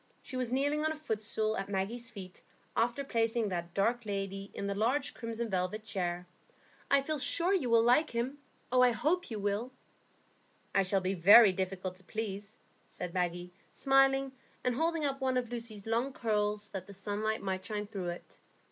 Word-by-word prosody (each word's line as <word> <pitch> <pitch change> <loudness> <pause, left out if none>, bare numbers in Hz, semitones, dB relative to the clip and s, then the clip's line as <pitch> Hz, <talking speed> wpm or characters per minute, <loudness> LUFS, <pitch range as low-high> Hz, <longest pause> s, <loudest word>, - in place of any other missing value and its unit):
She - - -8
was 250 -2 -1
kneeling 290 +3 +1
on 315 - +1
a - - -3
footstool 220 -6 -2
at 195 +1 -4
Maggie's 215 +5 -2
feet, 190 -5 -10 0.3
after 240 +4 +1
placing 230 -3 +1
that 170 -2 -4
dark 235 +5 +1
lady 195 -1 -4
in - - -3
the 200 - -1
large 235 +8 0
crimson 230 0 -4
velvet 190 +2 -2
chair. 180 -4 -2 0.6
"I 280 -1 +4
feel 310 +1 -2
sure 340 +7 +2
you 320 -11 +1
will 230 -1 +5
like 250 +7 +4
him. 250 +5 -2 0.3
I 250 0 +6
hope 300 +10 0
you 220 - -4
will." 205 +5 -1 1.0
"I 195 - +4
shall 195 0 +1
be 185 +1 0
very 200 +4 +8
difficult 185 0 -3
to 190 - -12
please," 205 0 -5 0.3
said 175 - -6
Maggie, 175 -1 -2 0.2
smiling, 270 0 +3 0.3
and 250 - +1
holding 325 +3 0
up 275 -1 -2
one 260 -1 +1
of 245 -2 -2
Lucy's 230 -4 -5
long 235 +4 0
curls, 210 -3 -1
that 190 -2 -6
the 200 - -10
sunlight 210 +2 -2
might 190 -1 -2
shine 210 -1 -3
through 195 -3 -5
it. 175 - -9
220 Hz, 180 wpm, -32 LUFS, 195-255 Hz, 1.0 s, very